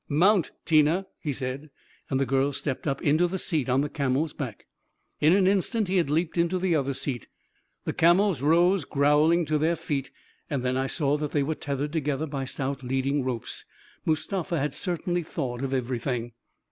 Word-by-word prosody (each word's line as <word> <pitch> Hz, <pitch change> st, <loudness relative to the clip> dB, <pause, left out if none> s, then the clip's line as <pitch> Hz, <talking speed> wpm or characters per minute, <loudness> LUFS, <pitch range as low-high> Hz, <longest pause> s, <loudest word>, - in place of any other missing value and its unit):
44 145 Hz, -, -2 dB
Mount, 195 Hz, -1 st, +4 dB
Tina!" 160 Hz, +4 st, +3 dB
he 150 Hz, -, -2 dB
said; 135 Hz, +3 st, -4 dB, 0.4 s
and 135 Hz, -, +1 dB
the 135 Hz, -, +2 dB
girl 135 Hz, +2 st, +1 dB
stepped 140 Hz, +1 st, -3 dB
up 135 Hz, -1 st, -1 dB
into 155 Hz, +5 st, +3 dB
the 190 Hz, +2 st, -3 dB
seat 155 Hz, -8 st, -1 dB
on 130 Hz, +2 st, +3 dB
the 145 Hz, -, 0 dB
camel's 140 Hz, +2 st, -1 dB
back. 125 Hz, -8 st, -6 dB, 0.5 s
In 155 Hz, -, +5 dB
an 195 Hz, -1 st, +4 dB
instant 200 Hz, +3 st, +1 dB
he 190 Hz, +1 st, +1 dB
had 170 Hz, -6 st, +2 dB
leaped 165 Hz, +3 st, 0 dB
into 170 Hz, +2 st, +2 dB
the 180 Hz, -1 st, +1 dB
other 140 Hz, -2 st, 0 dB
seat 125 Hz, -4 st, -3 dB, 0.3 s
— -, -, -44 dB
the -, -, -1 dB
camels 175 Hz, -, +4 dB
rose 170 Hz, +4 st, +4 dB
growling 150 Hz, +5 st, +3 dB
to 155 Hz, 0 st, 0 dB
their 165 Hz, +3 st, +2 dB
feet 140 Hz, -4 st, -3 dB, 0.2 s
— -, -, -39 dB
and 140 Hz, -4 st, -2 dB
then 125 Hz, 0 st, 0 dB
I 135 Hz, +1 st, 0 dB
saw 145 Hz, +1 st, +1 dB
that 150 Hz, -1 st, -4 dB
they 145 Hz, -, +2 dB
were 155 Hz, +3 st, -1 dB
tethered 145 Hz, 0 st, -3 dB
together 150 Hz, -1 st, -1 dB
by 140 Hz, -3 st, -4 dB
stout 135 Hz, +1 st, -2 dB
leading 135 Hz, +2 st, 0 dB
ropes. 125 Hz, -3 st, -4 dB, 0.4 s
Mustafa 170 Hz, +2 st, -1 dB
had 140 Hz, 0 st, -1 dB
certainly 175 Hz, -1 st, -1 dB
thought 135 Hz, -6 st, -4 dB
of 135 Hz, -, -2 dB
everything 125 Hz, -2 st, -2 dB
145 Hz, 195 wpm, -26 LUFS, 135-170 Hz, 0.5 s, In